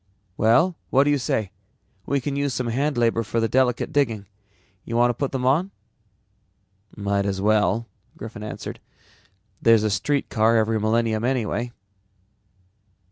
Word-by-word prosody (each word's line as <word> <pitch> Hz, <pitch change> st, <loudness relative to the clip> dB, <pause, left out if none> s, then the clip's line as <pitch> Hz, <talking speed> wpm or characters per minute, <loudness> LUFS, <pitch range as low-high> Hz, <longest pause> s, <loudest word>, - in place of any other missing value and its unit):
"Well, 120 Hz, -, +3 dB
what 135 Hz, +1 st, +4 dB
do 145 Hz, -, +2 dB
you 145 Hz, -, +2 dB
say? 110 Hz, -5 st, -1 dB, 0.6 s
We 140 Hz, -, +1 dB
can 140 Hz, +2 st, -3 dB
use 140 Hz, -2 st, -1 dB
some 125 Hz, -, -2 dB
hand 140 Hz, +3 st, -1 dB
labor 115 Hz, -1 st, +2 dB
for 115 Hz, +1 st, -2 dB
the 115 Hz, -, +1 dB
delicate 125 Hz, 0 st, +1 dB
digging. 115 Hz, -8 st, 0 dB, 0.6 s
Want 120 Hz, +1 st, +3 dB
to -, -, -5 dB
put 140 Hz, +2 st, -3 dB
them 130 Hz, -2 st, -2 dB
on?" 155 Hz, +9 st, +2 dB, 1.3 s
"Might 100 Hz, -1 st, 0 dB
as 95 Hz, -1 st, -2 dB
well." 105 Hz, +2 st, +2 dB, 0.3 s
Griffin 110 Hz, -1 st, -8 dB
answered. 105 Hz, -, -7 dB, 0.8 s
"There's 115 Hz, -2 st, +5 dB
a 110 Hz, -, +1 dB
streetcar 115 Hz, 0 st, +1 dB
every 110 Hz, 0 st, +1 dB
millennium 110 Hz, 0 st, +1 dB
anyway." 120 Hz, -1 st, -1 dB
115 Hz, 140 wpm, -23 LUFS, 110-135 Hz, 1.3 s, There's